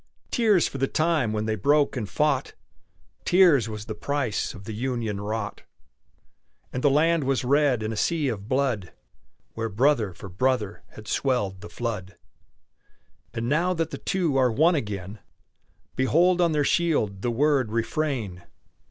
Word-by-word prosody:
Tears 215 -7 +3
for 135 - -7
the 135 - +1
time 155 -8 +1
when 110 0 -2
they 110 - 0
broke 145 +8 +2
and 110 -5 -3
fought! 150 -3 0 0.7
Tears 170 - +4
was 105 -1 -6
the 110 - -5
price 125 -1 -2
of 100 - -11
the 110 +1 -6
union 115 -3 -2
wrought! 105 0 -4 1.1
And 125 - -3
the 145 - +5
land 160 +3 +3
was 135 -1 0
red 135 -3 +2
in 110 +1 -2
a - - -4
sea 155 +6 0
of 105 -3 -4
blood, 130 -8 0 0.6
Where 115 0 -3
brother 115 -1 +2
for 100 - -9
brother 105 +2 -1
had 105 0 -12
swelled 105 -9 -1
the 105 - -9
flood! 100 -6 -5 1.2
And 115 0 -2
now 170 +7 +1
that 165 -1 -2
the - - -6
two 175 -8 0
are 130 -2 +3
one 160 +10 +4
again, 105 - -4 0.8
Behold 175 +7 +3
on 170 -1 +3
their 150 -1 +1
shield 140 - +1
the 120 - 0
word 135 -1 +2
"Refrain!" 115 - -2
125 Hz, 160 wpm, -25 LUFS, 110-150 Hz, 1.2 s, the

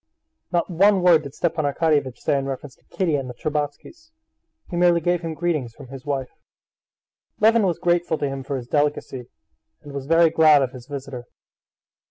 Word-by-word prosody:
Not 175 -1 +1
one 195 +2 +3
word 170 -3 +6
did 140 -2 -10
Stepan 165 -2 -1
Arkadyevitch 145 -3 0
say - - 0
in 135 0 -1
reference 135 0 -6
to - - -34
Kitty 175 -5 -1
and 135 -2 -5
the 125 - -8
Shtcherbatskys; 150 - -5 0.6
he - - -3
merely 175 -1 +4
gave 175 +1 0
him 165 -2 -5
greetings 155 -9 -2
from 140 -4 -13
his 135 +2 -10
wife. 135 -3 -2 1.1
Levin 220 -1 +4
was 175 - -1
grateful 175 -2 +1
to 145 - -1
him 135 0 -4
for 135 +1 -4
his 125 - -7
delicacy 145 -3 -1 0.5
and 145 -1 -10
was 140 -1 -6
very 165 0 +5
glad 155 -3 +5
of 130 - -3
his 125 -1 -12
visitor. 135 -4 -7
150 Hz, 185 wpm, -22 LUFS, 135-170 Hz, 1.1 s, word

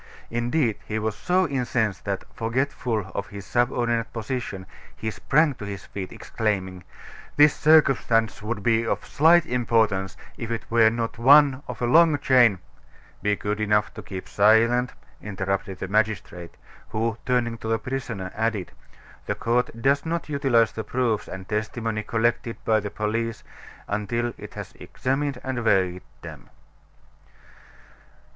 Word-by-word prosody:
Indeed, 120 0 0
he 110 - -2
was 110 -1 -2
so 185 +5 +1
incensed 120 -7 -1
that, 100 -2 -2
forgetful 115 -4 -2
of 100 - -3
his 100 -1 -9
subordinate 120 -1 0
position, 115 -4 -4 0.3
he 110 - -4
sprang 150 +6 +2
to 105 - -9
his 100 -1 -7
feet, 95 -2 -7
exclaiming: 95 -5 -3 0.5
"This 150 0 +6
circumstance 135 -8 +3
would 105 -1 -4
be 115 +1 +3
of 115 - -2
slight 165 +3 +4
importance 110 -7 0 0.2
if 115 - -5
it 115 -1 -3
were 115 -1 +6
not 115 0 -3
one 140 +1 +6
of - - -6
a - - +3
long 155 +4 +5
chain 125 -8 +4 0.3
" - - -28
"Be 105 0 +1
good 105 +1 -3
enough 105 0 +1
to 105 - -8
keep 95 0 -8
silent," 115 +4 +3 0.3
interrupted 100 -1 -3
the 95 - -5
magistrate, 95 -5 -2 0.3
who, 115 0 -2
turning 120 -2 0
to - - -6
the 115 0 +1
prisoner, 115 -7 -5
added: 110 -4 -2 0.6
"The - - -1
court 120 +2 0
does 140 +1 +3
not 165 -1 -3
utilize 135 -6 +2
the 110 - -5
proofs 115 -1 -1
and 95 0 -8
testimony 110 +1 -2
collected 115 +1 -1
by 110 -1 +3
the 105 0 -5
police 115 +2 -3 0.4
until 115 +3 -2
it - - -10
has - - -7
examined 135 0 -2
and 130 -2 -3
weighed 95 -4 +2 0.2
them." - - -10
115 Hz, 145 wpm, -24 LUFS, 105-125 Hz, 0.6 s, This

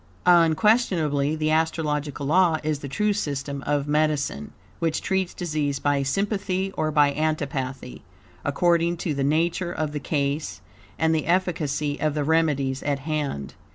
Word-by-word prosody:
Unquestionably, 165 - +3
the 155 0 0
astrological 150 -3 -1
law 165 +2 +4
is 155 -2 -1
the 145 - -6
true 210 +10 0
system 140 -6 -3
of 145 -1 0
medicine, 145 - 0 0.3
which 165 -2 0
treats 190 -2 0
disease 155 -5 -2
by 145 0 +1
sympathy 195 +4 -1
or 155 - 0
by 145 -2 +3
antipathy, 140 -4 -3 0.4
according 170 +3 +2
to 160 -2 -2
the 140 -1 -1
nature 170 +4 +1
of 155 -3 -2
the 150 - -3
case, 140 - -2 0.4
and 160 0 +2
the 155 - -1
efficacy 155 -5 0
of 155 -1 0
the 150 - 0
remedies 145 -4 +1
at 145 -1 0
hand. 140 - -3
155 Hz, 145 wpm, -24 LUFS, 140-165 Hz, 0.4 s, law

